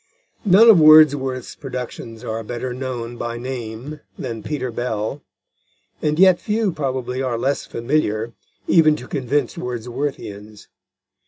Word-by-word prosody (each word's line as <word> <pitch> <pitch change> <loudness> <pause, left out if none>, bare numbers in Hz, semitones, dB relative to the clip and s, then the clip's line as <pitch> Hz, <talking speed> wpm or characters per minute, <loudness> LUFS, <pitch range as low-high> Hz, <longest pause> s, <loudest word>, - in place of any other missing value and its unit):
None 205 +4 +7
of 215 -7 +8
Wordsworth's 145 -5 +5
productions 125 -4 -7
are 110 +1 -4
better 120 +3 -5
known 120 -2 -5
by 120 0 -4
name 125 +3 -6 0.2
than 115 -4 -5
Peter 130 +1 -4
Bell, 115 +3 -3 0.8
and 150 0 0
yet 185 -1 +5
few, 215 -2 0
probably, 130 -4 -3
are 125 -3 -1
less 135 +4 -1
familiar, 115 -3 -1 0.3
even 155 -3 +5
to - - -9
convinced 135 -1 -1
Wordsworthians. 120 -4 -6
130 Hz, 120 wpm, -21 LUFS, 115-150 Hz, 0.8 s, of